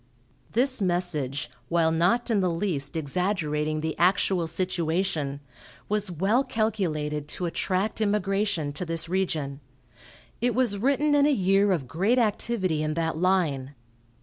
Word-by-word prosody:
This 255 0 +2
message, 155 -8 -1 0.2
while 165 -1 +3
not 185 +10 +2
in 215 - +3
the 185 -2 +2
least 165 -5 -1
exaggerating 155 -1 -1
the 160 0 -2
actual 180 -1 +2
situation, 165 -4 -1 0.5
was 210 -1 -1
well 195 - +1
calculated 155 - -1
to 175 +4 -3
attract 190 +5 -1
immigration 200 -6 0
to 155 - -4
this 165 -1 -1
region. 160 -7 -2 0.8
It 245 0 +1
was 240 -6 +1
written 280 +5 +2
in 290 0 +5
a - - +3
year 195 -3 +3
of 155 -9 -1
great 195 - +1
activity 205 -7 0
in 155 0 -1
that 165 -1 -1
line. 155 -7 +1
180 Hz, 135 wpm, -26 LUFS, 155-205 Hz, 0.8 s, in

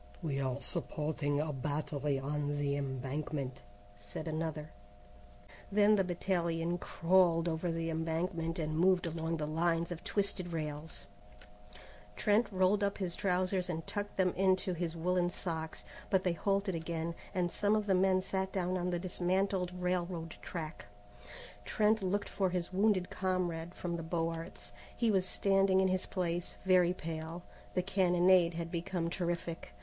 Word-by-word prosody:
"We 140 -4 -1
are 130 0 -1
supporting 150 -1 -1
a 150 0 -1
battery 145 +1 -1
on 145 +1 -2
the 140 -1 0
embankment," 135 0 -3 0.3
said 100 +10 -7
another. 155 -1 -3 1.0
Then 210 +1 +5
the 195 - +3
battalion 175 -1 0
crawled 170 -1 +3
over 165 +1 -1
the 165 0 -2
embankment 165 +1 -1
and 155 -2 -2
moved 180 0 +4
along 165 0 -2
the 150 - -2
lines 165 +2 +1
of 170 -1 -5
twisted 195 -4 -1
rails. 155 0 -4 1.1
Trent 210 - +2
rolled 190 +2 +3
up 200 0 0
his 185 -3 -2
trousers 185 0 +1
and 165 -2 -3
tucked 205 0 -4
them 185 -2 +3
into 185 -1 +2
his 170 -1 -2
woollen 175 +1 +1
socks: 160 -3 -3 0.3
but 190 -2 +3
they 180 - +2
halted 195 +3 0
again, 165 0 -3 0.2
and 175 -2 +1
some 205 +1 +2
of 215 -1 +1
the 195 - +3
men 185 0 +3
sat 190 0 -1
down 185 -1 0
on 180 0 -1
the 175 - 0
dismantled 185 +1 0
railroad 175 -2 -1
track. 160 -2 -5 0.8
Trent 215 0 +2
looked 200 +2 0
for 190 -2 0
his 180 0 -2
wounded 195 -2 +2
comrade 180 -2 -1
from 175 -1 -3
the - - -4
Beaux 165 0 -1
Arts. 165 +1 -7 0.3
He 230 -2 +3
was 190 -2 +2
standing 195 -1 +3
in 190 0 +4
his 185 0 0
place, 175 -2 -2
very 180 -2 +5
pale. 165 0 -5 0.3
The 180 - +2
cannonade 180 -2 +4
had 165 0 -4
become 175 0 -2
terrific. 170 - -3
175 Hz, 155 wpm, -33 LUFS, 160-185 Hz, 1.1 s, Then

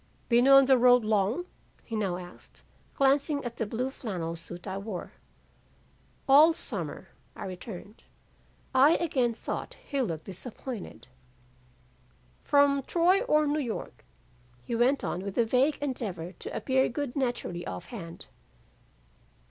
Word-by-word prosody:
"'Been 240 +2 +4
on 275 0 +8
the 260 -1 +5
road 245 -1 +6
long?' 215 - +1 0.4
he 230 - -6
now 195 -5 -1
asked, 180 0 -13 0.3
glancing 280 +1 +2
at 235 -1 -5
the 225 - -2
blue 250 +5 -2
flannel 175 -11 -4
suit 175 +3 -9
I 190 +1 -3
wore. 200 -3 -6 1.2
"'All 300 +4 +7
summer,' - - -5 0.3
I - - -7
returned, 190 +3 -9 0.7
"I 285 +5 +6
again 255 -8 0
thought - - -5
he 280 -2 -1
looked 165 -10 -3
disappointed. 225 +3 -8 1.4
"'From 285 -1 +4
Troy 355 +7 +3
or 305 -9 +3
New 295 +1 0
York?' 240 -6 -5 0.6
he - - -5
went 245 +4 +2
on 180 - -2
with 195 0 -6
a 235 - +4
vague 260 +6 +2
endeavor 200 - -4
to 185 - -9
appear 265 0 +2
good 270 0 -4
naturally 240 -10 -2
off 90 - -6
hand. 170 -7 -8
245 Hz, 135 wpm, -28 LUFS, 195-275 Hz, 1.4 s, on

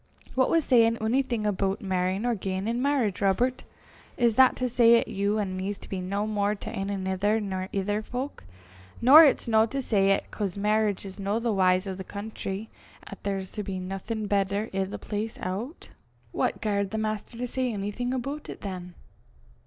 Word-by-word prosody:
"Wha 260 0 +4
was 330 -2 +2
sayin' 230 -2 +4
onything 235 0 0
aboot 195 0 0
merryin' 190 +2 -1
or 245 - +2
giein' 190 -1 -3
in 235 +2 -1
merriage, 260 -9 +1
Robert? 240 +6 +1 0.5
Is 235 -3 +3
that 260 +1 +6
to 255 - -1
say 235 -1 +6
'at - - -3
you 205 -1 0
an' 195 -3 -2
me's 195 +2 -3
to - - -13
be 190 -2 -4
no 200 +3 -2
more 210 -1 0
to - - -7
ane 195 +1 -3
anither 195 +2 0
nor 190 -2 -4
ither 205 +2 -1
fowk? 255 - -5 0.6
Nor 280 +7 +9
it's 275 - +2
no 220 -1 +4
to 275 +4 -3
say 200 -7 +2
'at, 195 - +1
'cause 200 -3 -3
merriage 210 -1 +1
is 190 0 -9
no 200 +2 0
the 235 0 0
w'y 185 -1 +3
o' 190 - -2
the 190 +1 -7
country, 205 +1 -6 0.3
'at - - -10
there's 195 -2 -3
to 210 - -4
be 195 -2 -4
naething 195 +4 -4
better 200 +1 0
i' 195 0 +1
the 190 - -6
place 215 +1 -4
o' 210 - -4
't." - - -16 0.4
"What - - -1
garred 200 -2 0
the 220 - -3
Maister 215 +3 -3
say 255 0 -1
onything 210 +4 -3
aboot 275 +4 -4
it - - -8
than?" 180 -3 -6
210 Hz, 195 wpm, -27 LUFS, 195-230 Hz, 0.6 s, Nor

